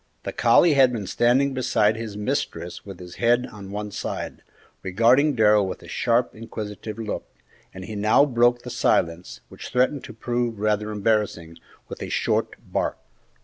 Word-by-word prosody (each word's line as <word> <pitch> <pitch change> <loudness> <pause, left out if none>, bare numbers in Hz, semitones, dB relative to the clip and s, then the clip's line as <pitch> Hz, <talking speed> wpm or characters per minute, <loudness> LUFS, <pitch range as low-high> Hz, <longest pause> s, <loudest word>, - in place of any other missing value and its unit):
The - - -5
collie 150 +7 +5
had 135 -3 +5
been 110 -5 -4
standing 125 +7 +2
beside 110 -4 +2
his 110 -2 -6
mistress 90 -4 -3
with 95 -3 -10
his 90 0 -11
head 120 +1 +2
on 100 -2 -10
one 105 +1 -5
side, - - -5 0.4
regarding 120 +10 +3
Darrell 105 -3 +4
with 95 - -6
a - - -12
sharp, 120 0 +1
inquisitive 110 -1 -7
look, 110 -2 -5 0.4
and 95 0 -9
he 110 - -7
now 110 +7 +4
broke 120 -2 +2
the 125 - -7
silence, 85 -7 0
which - - -9
threatened 130 +3 +1
to - - -10
prove 120 0 -2
rather 105 0 0
embarrassing, 105 -6 -1 0.3
with - - -9
a - - -5
short - - 0 0.2
bark. - - -1
110 Hz, 165 wpm, -24 LUFS, 105-120 Hz, 0.4 s, collie